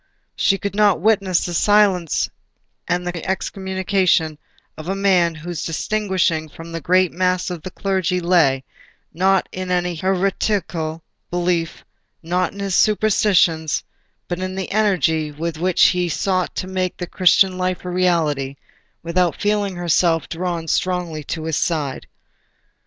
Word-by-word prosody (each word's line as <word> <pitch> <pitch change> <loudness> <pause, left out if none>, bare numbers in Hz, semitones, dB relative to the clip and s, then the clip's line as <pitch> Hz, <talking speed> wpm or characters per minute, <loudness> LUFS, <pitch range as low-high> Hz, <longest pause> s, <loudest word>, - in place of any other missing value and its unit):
She 195 - +2
could 200 0 -4
not 205 -3 +3
witness 195 -2 +2
the 175 - -4
silencing 195 -3 +2 0.6
and 180 +1 -1
excommunication 190 -3 0 0.4
of 155 +3 -8
a 195 - 0
man 185 -4 +2
whose 165 +2 -5
distinction 175 -3 -1
from 165 +3 -11
the 165 0 -5
great 185 +3 +3
mass 185 0 0
of 175 -3 -5
the 185 - -6
clergy 185 -1 -1
lay, 165 -7 +3 0.5
not 190 +3 +2
in 185 0 -5
any 180 -1 0
heretical 180 -3 -1 0.3
belief, 175 -2 -1 0.4
not 180 +2 0
in 200 - -12
his 195 -1 -2
superstitions, 195 -7 +2 0.4
but 175 0 -3
in 185 0 -4
the 190 -1 -4
energy 180 -7 +1
with 160 +2 -4
which 180 +1 +4
he 180 -1 0
sought 185 +2 -1
to - - -3
make 185 -1 -2
the 175 - -4
Christian 185 +1 +3
life 185 0 -2
a - - -3
reality, 160 -7 +1 0.5
without 170 0 0
feeling 205 -2 0
herself 170 -1 +1
drawn 170 -1 -3
strongly 175 -3 -1
to 160 +2 -4
his 160 -1 -1
side. 150 -6 -2
180 Hz, 140 wpm, -20 LUFS, 165-190 Hz, 0.6 s, which